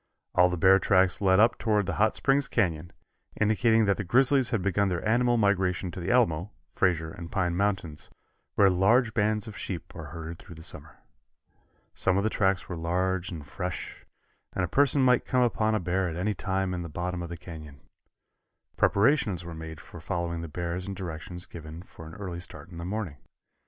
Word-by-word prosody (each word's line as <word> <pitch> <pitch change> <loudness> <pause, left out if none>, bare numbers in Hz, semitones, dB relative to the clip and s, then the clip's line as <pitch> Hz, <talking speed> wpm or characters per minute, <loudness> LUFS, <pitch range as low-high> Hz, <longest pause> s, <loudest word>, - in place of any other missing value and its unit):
All 90 0 +5
the 90 - -2
bear 95 +3 +6
tracks 95 -1 +3
led 95 -1 +4
up 115 +2 +4
toward 105 -3 +1
the 90 - -2
Hot 110 0 +3
Springs 135 0 +2
Canyon, 85 -6 -1 0.5
indicating 110 +1 +3
that 100 -1 +2
the - - -2
grizzlies 130 +5 +3
had 115 -7 -1
begun 100 +1 +1
their 90 +3 -2
annual 120 +2 +3
migration 95 -3 +1
to 90 - -7
the 85 - -4
Alamo, 105 -8 +2 0.2
Frazier 80 -3 +1
and 85 0 -9
Pine 90 -4 0
mountains, 90 -6 -2 0.5
where 100 - +6
large 110 +6 +3
bands 105 0 0
of 110 - -8
sheep 95 -3 -6
are - - -7
herded 80 0 -7
through 85 - -12
the 80 - -11
summer. - - -8 1.0
Some 95 0 +1
of 100 - +1
the 110 - 0
tracks 95 -2 +1
were 90 - -5
large 90 +2 -1
and 80 -5 -7
fresh, 90 +4 -6 0.5
and 95 -2 0
a - - -5
person 140 - +3
might 125 -1 +4
come 125 -1 +2
upon 110 -2 +1
a - - +1
bear 90 +1 0
at 80 - -5
any 95 +5 -1
time 95 -2 -2
in 90 - -3
the 85 - -6
bottom 90 +3 -3
of 85 - -6
the 85 - -6
canyon. 80 -5 -10 1.0
Preparations 105 - +2
were 85 - -7
made 80 -1 -8
for 85 - -12
following 85 -1 -3
the 85 - -5
bears 85 +3 -4
and 100 - -4
directions 90 -1 -5
given 80 0 -9
for 80 -3 -12
an 80 - -10
early 95 -4 -6
start 85 -1 -7
in 85 -2 -9
the - - -5
morning. 95 -6 -4
95 Hz, 200 wpm, -28 LUFS, 85-105 Hz, 1.0 s, bear